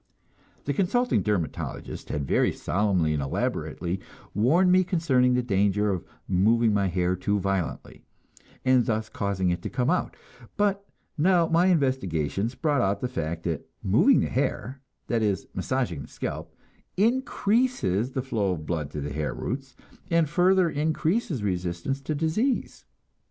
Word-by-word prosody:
The 145 Hz, -, 0 dB
"consulting 225 Hz, -, +1 dB
dermatologist" 90 Hz, -9 st, -3 dB
had 75 Hz, -1 st, -2 dB
very -, -, +2 dB
solemnly 90 Hz, -5 st, 0 dB
and 75 Hz, -, -1 dB
elaborately 85 Hz, +6 st, -2 dB, 0.3 s
warned 160 Hz, -, +4 dB
me 185 Hz, +1 st, +5 dB
concerning 140 Hz, -9 st, +2 dB
the 125 Hz, -, +1 dB
danger 105 Hz, -1 st, +2 dB
of 90 Hz, -3 st, -2 dB, 0.2 s
moving 110 Hz, +4 st, +3 dB
my 100 Hz, -1 st, +2 dB
hair 90 Hz, 0 st, 0 dB
too 100 Hz, +3 st, 0 dB
violently, 95 Hz, -2 st, -3 dB, 0.6 s
and 130 Hz, -1 st, +5 dB
thus 110 Hz, -1 st, -1 dB
causing 95 Hz, -3 st, -1 dB
it 85 Hz, -, -2 dB
to -, -, -4 dB
come 125 Hz, +3 st, 0 dB
out; 180 Hz, -, -1 dB, 0.4 s
but 200 Hz, -1 st, 0 dB, 0.3 s
now 175 Hz, +1 st, +4 dB
my 170 Hz, +3 st, +3 dB
investigations 120 Hz, -, 0 dB
brought 145 Hz, -4 st, +1 dB
out 100 Hz, -1 st, +1 dB
the 125 Hz, -, 0 dB
fact 85 Hz, -7 st, -4 dB
that 80 Hz, -4 st, -3 dB
moving -, -, +4 dB
the -, -, -1 dB
hair, 130 Hz, +1 st, -2 dB, 0.2 s
that 115 Hz, -2 st, 0 dB
is, 100 Hz, -3 st, 0 dB
massaging 125 Hz, -, -2 dB
the -, -, -9 dB
scalp, -, -, -5 dB, 0.5 s
increases 215 Hz, -, +1 dB
the 130 Hz, -, -2 dB
flow 105 Hz, -8 st, 0 dB
of 80 Hz, -3 st, -6 dB
blood 75 Hz, -4 st, -2 dB
to 75 Hz, -, -5 dB
the 70 Hz, 0 st, -4 dB
hair 75 Hz, 0 st, -2 dB
roots, 135 Hz, 0 st, -5 dB, 0.3 s
and 165 Hz, -2 st, +3 dB
further 180 Hz, +4 st, +3 dB
increases 160 Hz, -, 0 dB
resistance 90 Hz, +7 st, -2 dB
to 155 Hz, +2 st, -3 dB
disease. 170 Hz, -, -1 dB
115 Hz, 150 wpm, -26 LUFS, -, 0.6 s, me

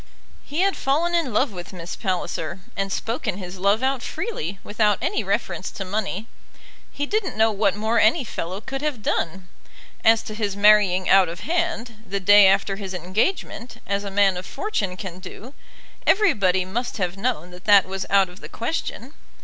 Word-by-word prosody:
He 300 Hz, +5 st, -2 dB
had 390 Hz, 0 st, +2 dB
fallen 315 Hz, +6 st, 0 dB
in 330 Hz, -7 st, +1 dB
love 250 Hz, +4 st, +2 dB
with 180 Hz, 0 st, -9 dB
Miss 170 Hz, -2 st, -6 dB
Palliser, 185 Hz, -2 st, -3 dB
and 195 Hz, 0 st, -2 dB
spoken 225 Hz, -2 st, -2 dB
his 185 Hz, -1 st, -8 dB
love 200 Hz, +5 st, +2 dB
out 265 Hz, -1 st, +1 dB
freely, 200 Hz, -, -4 dB
without 210 Hz, -1 st, +1 dB
any 225 Hz, -, -1 dB
reference 195 Hz, 0 st, -2 dB
to 195 Hz, -, -6 dB
money. 205 Hz, +1 st, -3 dB, 0.7 s
He 290 Hz, -, -2 dB
didn't 410 Hz, -, -2 dB
know 220 Hz, 0 st, +4 dB
what 200 Hz, -2 st, +1 dB
more 220 Hz, +2 st, +1 dB
any 230 Hz, +8 st, +4 dB
fellow 190 Hz, -3 st, -5 dB
could 270 Hz, +3 st, -5 dB
have 290 Hz, -8 st, -3 dB
done. 180 Hz, +1 st, -2 dB, 0.6 s
As 225 Hz, 0 st, +5 dB
to 215 Hz, -, -7 dB
his 210 Hz, -2 st, -2 dB
marrying 200 Hz, -3 st, +5 dB
out 190 Hz, -3 st, +6 dB
of 170 Hz, +4 st, -7 dB
hand, 315 Hz, -5 st, -2 dB
the 200 Hz, -1 st, -3 dB
day 205 Hz, +1 st, +7 dB
after 195 Hz, 0 st, +2 dB
his 190 Hz, -2 st, -5 dB
engagement, 220 Hz, -, -2 dB
as 200 Hz, 0 st, -1 dB
a 200 Hz, -, -4 dB
man 195 Hz, -1 st, +3 dB
of 180 Hz, -, -6 dB
fortune 200 Hz, -, -3 dB
can 185 Hz, -2 st, -7 dB
do, 210 Hz, +7 st, -10 dB, 0.5 s
everybody 200 Hz, -, +3 dB
must 240 Hz, +6 st, -3 dB
have 180 Hz, -2 st, -1 dB
known 195 Hz, -5 st, -2 dB
that 180 Hz, +1 st, -13 dB
that 205 Hz, -2 st, +7 dB
was 190 Hz, 0 st, -5 dB
out 195 Hz, -1 st, +4 dB
of 180 Hz, +1 st, -14 dB
the -, -, -9 dB
question. 255 Hz, +1 st, -4 dB
205 Hz, 180 wpm, -23 LUFS, 190-240 Hz, 0.7 s, day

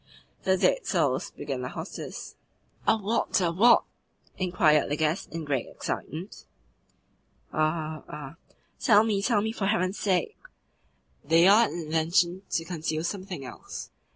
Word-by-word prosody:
"The 190 Hz, 0 st, +3 dB
dead -, -, +2 dB
souls," -, -, +1 dB
began -, -, -5 dB
the -, -, -4 dB
hostess. -, -, -7 dB, 0.5 s
"Are 220 Hz, -, +4 dB
what, 210 Hz, +1 st, 0 dB
are 170 Hz, -2 st, +1 dB
what?" 230 Hz, +7 st, +6 dB, 0.5 s
inquired 175 Hz, -5 st, +3 dB
the 145 Hz, -, 0 dB
guest 155 Hz, +3 st, -1 dB
in 165 Hz, -1 st, -5 dB
great 135 Hz, -4 st, -1 dB
excitement. 170 Hz, +7 st, -6 dB, 1.1 s
"Are, 155 Hz, 0 st, -1 dB
are 150 Hz, 0 st, -8 dB, 0.2 s
" -, -, -40 dB
"Tell 215 Hz, -3 st, +6 dB
me, 210 Hz, -3 st, 0 dB
tell 215 Hz, -1 st, +2 dB
me, 220 Hz, -, -1 dB
for 205 Hz, -3 st, -2 dB
heaven's 195 Hz, -1 st, 0 dB
sake!" 185 Hz, -4 st, 0 dB, 0.8 s
"They 165 Hz, +4 st, +5 dB
are 215 Hz, +4 st, +7 dB
an -, -, -7 dB
invention 170 Hz, +3 st, +1 dB
to 165 Hz, -, -1 dB
conceal 160 Hz, -2 st, -3 dB
something 185 Hz, -5 st, -4 dB
else. 125 Hz, -, -8 dB
175 Hz, 145 wpm, -27 LUFS, 155-200 Hz, 1.1 s, are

